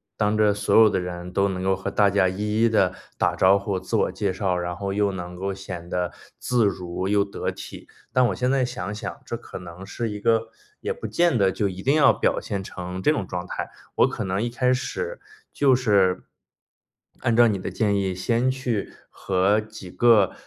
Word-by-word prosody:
当 105 Hz, +1 st, +1 dB
着 105 Hz, -1 st, +4 dB
所 100 Hz, 0 st, 0 dB
有 110 Hz, -1 st, +8 dB
的 95 Hz, -, 0 dB
人 90 Hz, 0 st, -6 dB
都 100 Hz, +1 st, +2 dB
能 95 Hz, -1 st, -3 dB
够 95 Hz, 0 st, +2 dB
和 95 Hz, +1 st, -4 dB
大 100 Hz, 0 st, +3 dB
家 95 Hz, -2 st, +3 dB
一 105 Hz, +3 st, -1 dB
一 115 Hz, -, +5 dB
地 95 Hz, -4 st, +2 dB, 0.2 s
打 -, -, +1 dB
招 95 Hz, +1 st, +5 dB
呼， 100 Hz, -1 st, -2 dB
自 95 Hz, -, -4 dB
我 -, -, +2 dB
介 100 Hz, -2 st, -1 dB
绍， 95 Hz, -1 st, -1 dB
然 90 Hz, 0 st, -3 dB
后 100 Hz, -1 st, -3 dB
又 100 Hz, -1 st, +1 dB
能 90 Hz, -1 st, -6 dB
够 95 Hz, +2 st, -3 dB
显 95 Hz, -3 st, -8 dB
得 90 Hz, -2 st, -1 dB, 0.3 s
自 120 Hz, -3 st, +1 dB
如 95 Hz, -1 st, -2 dB
又 100 Hz, 0 st, +2 dB
得 100 Hz, -, -4 dB
体。 -, -, -9 dB, 0.3 s
但 125 Hz, -1 st, +4 dB
我 -, -, -2 dB
现 125 Hz, 0 st, 0 dB
在 135 Hz, -1 st, +2 dB
想 120 Hz, -6 st, -4 dB
想， 105 Hz, -, -6 dB
这 -, -, -4 dB
可 -, -, -9 dB
能 90 Hz, +1 st, -10 dB
是 115 Hz, 0 st, -4 dB
一 105 Hz, -, -5 dB
个 115 Hz, +1 st, +1 dB, 0.3 s
也 465 Hz, -, -2 dB
不 475 Hz, -, -6 dB
见 170 Hz, -5 st, +2 dB
得 95 Hz, -2 st, +3 dB
就 100 Hz, +1 st, 0 dB
一 95 Hz, 0 st, -6 dB
定 140 Hz, +6 st, +2 dB
要 145 Hz, -3 st, +6 dB
表 -, -, +1 dB
现 100 Hz, -3 st, -4 dB
成 90 Hz, 0 st, -6 dB
这 150 Hz, -, +4 dB
种 120 Hz, -11 st, -1 dB
状 90 Hz, 0 st, -5 dB
态， -, -, -5 dB, 0.2 s
我 -, -, +5 dB
可 -, -, -4 dB
能 95 Hz, +2 st, -1 dB
一 120 Hz, -, -1 dB
开 125 Hz, +1 st, +1 dB
始 470 Hz, -, -3 dB, 0.3 s
就 135 Hz, -3 st, +3 dB
是， 100 Hz, -7 st, +2 dB, 1.0 s
按 120 Hz, -3 st, +1 dB
照 120 Hz, 0 st, +6 dB
你 105 Hz, -, 0 dB
的 95 Hz, -, -5 dB
建 105 Hz, -3 st, +1 dB
议 95 Hz, -2 st, 0 dB
先 115 Hz, +7 st, +1 dB
去 125 Hz, -5 st, -3 dB, 0.2 s
和 95 Hz, +2 st, +1 dB
几 110 Hz, -3 st, -9 dB
个， 110 Hz, -1 st, +4 dB
100 Hz, 235 characters per minute, -24 LUFS, 95-115 Hz, 1.0 s, 有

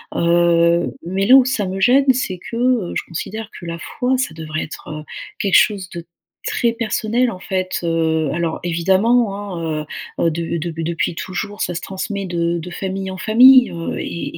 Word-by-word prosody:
Heu, 170 Hz, 0 st, +3 dB
mais 190 Hz, +3 st, -1 dB
là 250 Hz, +5 st, +7 dB
où 270 Hz, -, +8 dB
ça 245 Hz, -5 st, -1 dB
me 190 Hz, +1 st, -4 dB
gêne, 265 Hz, +4 st, +5 dB
c'est 195 Hz, -8 st, -3 dB
que, -, -, -6 dB
heu, 240 Hz, -6 st, +1 dB
je -, -, -1 dB
considère 215 Hz, +6 st, -6 dB
que 175 Hz, -, -10 dB
la 170 Hz, 0 st, -5 dB
foi, 250 Hz, +7 st, -1 dB
ça 255 Hz, -11 st, -2 dB
devrait 155 Hz, -1 st, -4 dB
être 155 Hz, 0 st, -8 dB, 0.4 s
quelque 200 Hz, -, +1 dB
chose 195 Hz, -4 st, +2 dB
de 170 Hz, -2 st, -8 dB, 0.4 s
très 235 Hz, -, +1 dB
personnel, 230 Hz, +1 st, 0 dB
en 200 Hz, -, -6 dB
fait 185 Hz, 0 st, -3 dB
heu. 160 Hz, -3 st, 0 dB
Alors 165 Hz, 0 st, -2 dB
évidemment, 195 Hz, +6 st, +2 dB, 0.2 s
hein 155 Hz, -2 st, -3 dB, 0.3 s
heu -, -, +2 dB
heu, 165 Hz, -, +3 dB
de 165 Hz, +1 st, -3 dB
dep 165 Hz, 0 st, -5 dB
depuis 165 Hz, +1 st, -1 dB
toujours, 190 Hz, +5 st, -5 dB
ça 175 Hz, -, -1 dB
se -, -, -3 dB
transmet 195 Hz, +1 st, -4 dB
de 170 Hz, -1 st, -1 dB
de 170 Hz, +1 st, -6 dB
famille 190 Hz, +1 st, -4 dB
en 190 Hz, -, -7 dB
famille, 245 Hz, +5 st, +7 dB
heu, 165 Hz, -1 st, -4 dB
et 170 Hz, -, -5 dB
185 Hz, 190 wpm, -19 LUFS, 170-215 Hz, 0.4 s, où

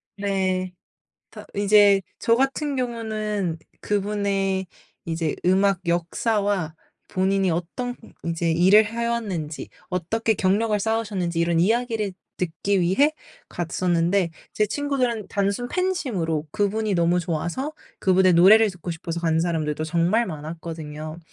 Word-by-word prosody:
네. 190 Hz, -2 st, -1 dB, 0.6 s
다 -, -, -11 dB
이제 205 Hz, 0 st, +5 dB, 0.2 s
저 230 Hz, -, +3 dB
같은 270 Hz, +2 st, 0 dB
경우는 215 Hz, -7 st, -2 dB, 0.2 s
그분의 200 Hz, -2 st, -1 dB, 0.4 s
이제 165 Hz, -2 st, -2 dB
음악 190 Hz, +1 st, +3 dB
역사와 180 Hz, 0 st, 0 dB, 0.3 s
본인이 190 Hz, 0 st, +1 dB
어떤 180 Hz, +9 st, -3 dB, 0.3 s
이제 170 Hz, 0 st, -1 dB
일을 190 Hz, +6 st, +6 dB
해왔는지, 225 Hz, -9 st, -3 dB, 0.2 s
어떻게 220 Hz, +6 st, 0 dB
경력을 210 Hz, +3 st, +1 dB
쌓으셨는지 205 Hz, -6 st, -1 dB
이런 170 Hz, 0 st, +2 dB
이야기를 225 Hz, 0 st, +1 dB, 0.2 s
듣기 185 Hz, +3 st, 0 dB
위해 195 Hz, -, +3 dB, 0.4 s
갔었는데 175 Hz, +1 st, 0 dB, 0.2 s
제 210 Hz, -, +1 dB
친구들은 255 Hz, -4 st, -1 dB
단순 200 Hz, +4 st, -1 dB
팬심으로 230 Hz, -, -1 dB
그분이 205 Hz, +3 st, 0 dB
너무 175 Hz, 0 st, +2 dB
좋아서 175 Hz, -, -3 dB, 0.3 s
그분의 185 Hz, -1 st, +4 dB
노래를 205 Hz, +5 st, +7 dB
듣고 180 Hz, -1 st, -7 dB
싶어서 165 Hz, +1 st, -4 dB
가는 160 Hz, -1 st, +1 dB
사람들도 155 Hz, -2 st, -1 dB
정말 175 Hz, +8 st, +2 dB
많았거든요. 155 Hz, -1 st, -7 dB
190 Hz, 285 characters per minute, -24 LUFS, 170-215 Hz, 0.6 s, 노래를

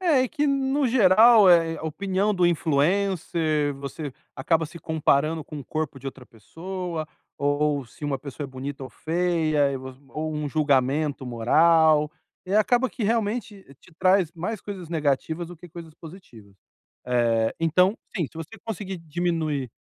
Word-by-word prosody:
É, 320 Hz, -8 st, +3 dB
e 255 Hz, -, -1 dB
que, 295 Hz, -1 st, -1 dB
no 275 Hz, 0 st, +1 dB
geral, 220 Hz, -2 st, +6 dB
é 165 Hz, -2 st, +4 dB
a -, -, -10 dB
opinião 195 Hz, +6 st, -1 dB
do 180 Hz, -1 st, +3 dB
influencer. 160 Hz, -2 st, +1 dB
Você 140 Hz, +1 st, -6 dB, 0.2 s
acaba 160 Hz, +3 st, +1 dB
se 170 Hz, +2 st, -11 dB
comparando 155 Hz, 0 st, +1 dB
com 150 Hz, -, -8 dB
o 135 Hz, -, -8 dB
corpo 155 Hz, -3 st, -4 dB
de 135 Hz, -, -10 dB
outra 130 Hz, -1 st, -8 dB
pessoa, 170 Hz, -, -6 dB, 0.3 s
ou 145 Hz, -1 st, 0 dB
se 130 Hz, +6 st, -12 dB
uma 140 Hz, -2 st, -1 dB
pessoa 140 Hz, +1 st, -7 dB
é -, -, -6 dB
bonita 135 Hz, +1 st, -6 dB
ou -, -, -9 dB
feia 160 Hz, -4 st, 0 dB
e 135 Hz, -, -2 dB
vo 130 Hz, 0 st, -8 dB, 0.2 s
ou 155 Hz, +1 st, -4 dB
um 150 Hz, -1 st, -3 dB
julgamento 140 Hz, -1 st, +1 dB
moral. 150 Hz, +6 st, +4 dB, 0.4 s
E 195 Hz, -, -2 dB
acaba 245 Hz, +4 st, +3 dB
que 230 Hz, -, -7 dB
realmente 215 Hz, -1 st, -1 dB, 0.2 s
te 175 Hz, -, -20 dB
traz 185 Hz, -3 st, +3 dB
mais 185 Hz, +5 st, -4 dB
coisas 190 Hz, -5 st, -8 dB
negativas 160 Hz, +2 st, -1 dB
do 175 Hz, -, -10 dB
que 175 Hz, +2 st, -13 dB
coisas 165 Hz, -1 st, -10 dB
positivas. 140 Hz, -, -14 dB, 0.8 s
Eh, 115 Hz, 0 st, 0 dB
então, 180 Hz, +6 st, +3 dB, 0.2 s
sim, 170 Hz, -8 st, -1 dB
se -, -, -27 dB
você 165 Hz, +8 st, -8 dB
conseguir 195 Hz, -3 st, -5 dB
diminuir 160 Hz, -5 st, -2 dB
160 Hz, 165 wpm, -25 LUFS, 145-185 Hz, 0.8 s, geral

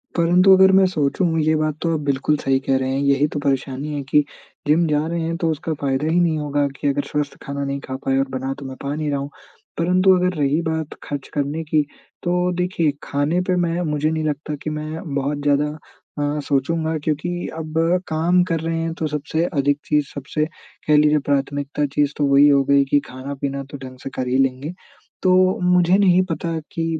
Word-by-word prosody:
परंतु 180 Hz, +3 st, +5 dB
अगर 190 Hz, 0 st, +7 dB
मैं 190 Hz, -, +6 dB
सोचूँ 165 Hz, +1 st, 0 dB
ये 155 Hz, +1 st, +2 dB
बात 155 Hz, -1 st, 0 dB
तो 165 Hz, -1 st, 0 dB
आप 155 Hz, -, 0 dB
बिल्कुल 140 Hz, +2 st, +1 dB
सही 135 Hz, -1 st, +1 dB
कह 135 Hz, 0 st, +1 dB
रहे 130 Hz, 0 st, -1 dB
हैं 135 Hz, -, 0 dB
यही 140 Hz, +1 st, +3 dB
तो 145 Hz, -, -2 dB
परेशानी 140 Hz, +1 st, -2 dB
है 145 Hz, -, -2 dB
कि, 145 Hz, +2 st, +3 dB, 0.4 s
जिम 160 Hz, +3 st, +4 dB
जा 150 Hz, 0 st, +1 dB
रहे 170 Hz, 0 st, -2 dB
हैं 165 Hz, +1 st, -2 dB
तो 165 Hz, -2 st, 0 dB
उसका 160 Hz, +1 st, -3 dB
फ़ायदा 135 Hz, +2 st, 0 dB
ही 165 Hz, +2 st, +2 dB
नहीं 165 Hz, -3 st, +2 dB
होगा 145 Hz, -1 st, 0 dB
कि 145 Hz, -, -1 dB
अगर 140 Hz, +1 st, +1 dB
स्वस्थ 150 Hz, -1 st, -2 dB
खाना 140 Hz, 0 st, -4 dB
नहीं 140 Hz, 0 st, -3 dB
खा 130 Hz, -, -5 dB
पाए 135 Hz, 0 st, +2 dB
और 135 Hz, 0 st, +1 dB
बना 130 Hz, +1 st, -3 dB
तो 140 Hz, -, -8 dB
मैं 130 Hz, 0 st, -6 dB
पा 140 Hz, +1 st, -3 dB
नहीं 155 Hz, -1 st, -2 dB
रहा 140 Hz, -, 0 dB
हूँ। 140 Hz, +1 st, -5 dB, 0.5 s
परंतु 185 Hz, +3 st, +4 dB
अगर 180 Hz, 0 st, +1 dB
रही 145 Hz, +3 st, +1 dB
बात 160 Hz, -1 st, -3 dB
खर्च 145 Hz, -2 st, -5 dB
करने 145 Hz, +3 st, -2 dB
की, 155 Hz, -1 st, +2 dB, 0.4 s
तो 180 Hz, +1 st, +1 dB
देखिए 180 Hz, -4 st, 0 dB
खाने 145 Hz, +5 st, 0 dB
पे 180 Hz, 0 st, 0 dB
मैं 175 Hz, 0 st, 0 dB
मुझे 150 Hz, -2 st, 0 dB
नहीं 160 Hz, 0 st, -1 dB
लगता 150 Hz, 0 st, -2 dB
कि -, -, -2 dB
मैं 155 Hz, +1 st, -5 dB
बहुत 140 Hz, +1 st, -1 dB
ज़्यादा 145 Hz, +1 st, +1 dB, 0.4 s
अ, 145 Hz, +1 st, -1 dB
सोचूँगा 160 Hz, +4 st, 0 dB
क्योंकि 175 Hz, +4 st, -2 dB
अब 160 Hz, 0 st, -5 dB, 0.3 s
काम 165 Hz, +3 st, +2 dB
कर 165 Hz, -3 st, -1 dB
रहे 165 Hz, +1 st, -2 dB
हैं 165 Hz, 0 st, -2 dB
तो 160 Hz, -, -2 dB
सबसे 150 Hz, +2 st, -1 dB
अधिक 145 Hz, -1 st, +2 dB
चीज़ 150 Hz, -1 st, +1 dB
सबसे 145 Hz, +2 st, -2 dB, 0.4 s
कह 150 Hz, -, +5 dB
लीजिए 150 Hz, 0 st, +4 dB
प्राथमिकता 145 Hz, +1 st, 0 dB
चीज़ 145 Hz, -1 st, +1 dB
तो 145 Hz, -, +1 dB
वो 140 Hz, -, +3 dB
ही 145 Hz, +1 st, +7 dB
हो 140 Hz, -1 st, +4 dB
गई 140 Hz, +1 st, +4 dB
कि 145 Hz, +1 st, +3 dB
खाना-पीना 140 Hz, +1 st, -5 dB
तो 140 Hz, -, -6 dB
ढंग 130 Hz, -1 st, -10 dB
से -, -, -4 dB
कर 130 Hz, -, -2 dB
ही 130 Hz, +1 st, +1 dB
लेंगे। 135 Hz, +4 st, 0 dB, 0.5 s
तो 185 Hz, -1 st, +4 dB, 0.4 s
मुझे 180 Hz, +1 st, +4 dB
नहीं 185 Hz, -3 st, +4 dB
पता 165 Hz, +1 st, -2 dB
कि 165 Hz, -, -2 dB
150 Hz, 215 wpm, -21 LUFS, 140-165 Hz, 0.5 s, अगर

